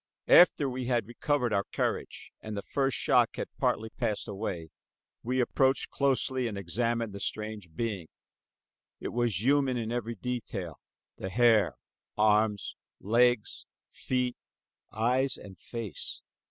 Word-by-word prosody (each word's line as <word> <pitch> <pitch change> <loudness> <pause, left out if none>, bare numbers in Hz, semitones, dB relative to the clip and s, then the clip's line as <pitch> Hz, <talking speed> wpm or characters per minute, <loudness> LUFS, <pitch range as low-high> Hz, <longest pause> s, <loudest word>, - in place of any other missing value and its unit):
After 165 -5 +7
we 130 -1 -3
had 120 -3 +1
recovered 125 +1 0
our 100 0 +1
courage - - -3
and 110 -1 -6
the 100 - -4
first 135 -4 0
shock - - +3
had - - -6
partly 110 +1 0
passed 105 +1 -2
away, 95 -6 -4 0.5
we 125 +2 -1
approached 130 +2 +2
closely 130 -2 +1
and 105 -3 -4
examined 115 +4 -1
the 100 - -6
strange 105 -6 -4
being. 100 -5 -3 0.9
It - - -4
was 115 -5 0
human 135 -1 +3
in 115 -1 -3
every 120 -1 -2
detail, 105 - -4 0.4
the 95 - -4
hair, 110 -2 +4 0.4
arms, 105 -1 +2 0.2
legs, 120 +1 +2 0.2
feet, 125 -1 -1 0.6
eyes 125 +4 +1
and 100 -2 -11
face. 110 - -5
115 Hz, 130 wpm, -29 LUFS, 105-125 Hz, 0.9 s, After